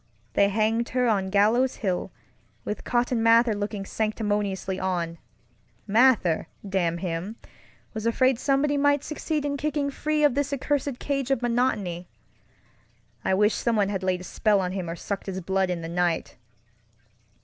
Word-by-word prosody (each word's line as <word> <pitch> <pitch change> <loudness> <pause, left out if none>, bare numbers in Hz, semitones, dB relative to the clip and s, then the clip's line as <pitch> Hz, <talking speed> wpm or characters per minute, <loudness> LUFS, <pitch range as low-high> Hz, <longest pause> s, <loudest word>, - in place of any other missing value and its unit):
They 200 - +4
hanged 220 +3 +1
her 250 -1 +3
on 195 -4 +1
Gallows 220 +6 +3
Hill, 190 -2 -2 0.5
with 210 - -4
Cotton 240 -1 0
Mather 230 0 +5
looking 205 -1 -4
sanctimoniously 205 -3 -2
on. 170 -3 -2 0.7
Mather, 220 -6 +3 0.2
damn 175 -3 0
him, 180 +4 -4 0.6
was 220 0 -3
afraid 255 +1 +2
somebody 285 +1 +1
might 285 0 +3
succeed 305 -1 -3
in 285 0 -1
kicking 285 0 -1
free 305 +2 -1
of 295 - +5
this 285 +1 -1
accursed 280 -1 -1
cage 275 -1 -2
of 270 -3 +1
monotonyŌĆöI 220 -8 0 1.3
wish 210 +3 +3
someone 215 -4 +1
had 195 -2 -2
laid 185 -1 0
a - - -8
spell 205 +3 +1
on 180 -1 -1
him 185 -3 -4
or 165 - -4
sucked 200 +3 -5
his 190 -1 -3
blood 190 +1 0
in 175 -2 -2
the - - -4
night! 170 -1 -1
215 Hz, 150 wpm, -26 LUFS, 190-260 Hz, 1.3 s, Mather